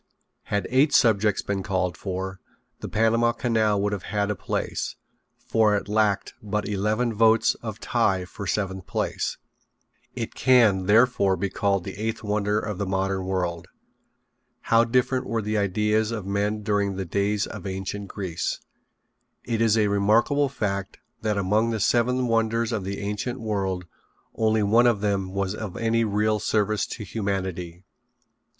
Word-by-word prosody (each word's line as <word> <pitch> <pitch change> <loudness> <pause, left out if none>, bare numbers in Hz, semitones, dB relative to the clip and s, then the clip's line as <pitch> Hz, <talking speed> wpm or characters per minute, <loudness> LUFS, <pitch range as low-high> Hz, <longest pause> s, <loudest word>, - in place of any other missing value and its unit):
Had 100 -1 -1
eight 140 +3 +4
subjects 105 -4 +3
been 100 -1 -2
called 95 -2 -1
for 95 -1 -5 0.4
the - - -6
Panama 115 +2 +2
Canal 110 -4 +1
would 105 0 0
have 100 - -3
had 105 0 0
a - - -2
place, 95 - -3 0.5
for 110 -2 +3
it 100 - -5
lacked 105 -1 +1
but 105 0 -2
eleven 105 +4 0
votes 110 +1 +4
of - - -6
tie 95 -1 +1
for 100 +2 -8
seventh 95 0 -2
place. - - -2 0.8
It 115 -3 -4
can, 110 -8 +4
therefore, 105 -3 +4
be 95 +2 -2
called 100 -3 0
the 95 - -7
eighth 110 +2 -3
wonder 105 0 0
of 105 -3 -5
the 100 - -2
modern 95 0 -1
world. 90 -3 -2 0.9
How 115 +1 +4
different 125 +2 +1
were 115 - -1
the 105 +1 0
ideas 105 +2 +1
of 110 -4 -4
men 105 +2 -1
during 100 -2 0
the 95 0 -3
days 100 +3 0
of - - -7
ancient 95 +1 -4
Greece. 95 -5 -3 0.8
It 115 -1 -2
is 115 -1 +4
a 110 - +3
remarkable 110 +8 +2
fact 100 -7 -3 0.2
that 105 -2 0
among 105 +4 +2
the 110 -1 -1
seven 125 +4 +2
wonders 115 0 +1
of 110 -4 -2
the 100 +1 -4
ancient 105 +5 -3
world 95 -5 -2 0.5
only 110 -1 +2
one 115 +4 +5
of 110 -4 +2
them 100 -2 -1
was 100 0 -1
of 105 -3 -6
any 115 0 +1
real 105 0 +1
service 105 -1 0
to 110 - -6
humanity. 95 -4 -4
105 Hz, 155 wpm, -25 LUFS, 95-115 Hz, 0.9 s, one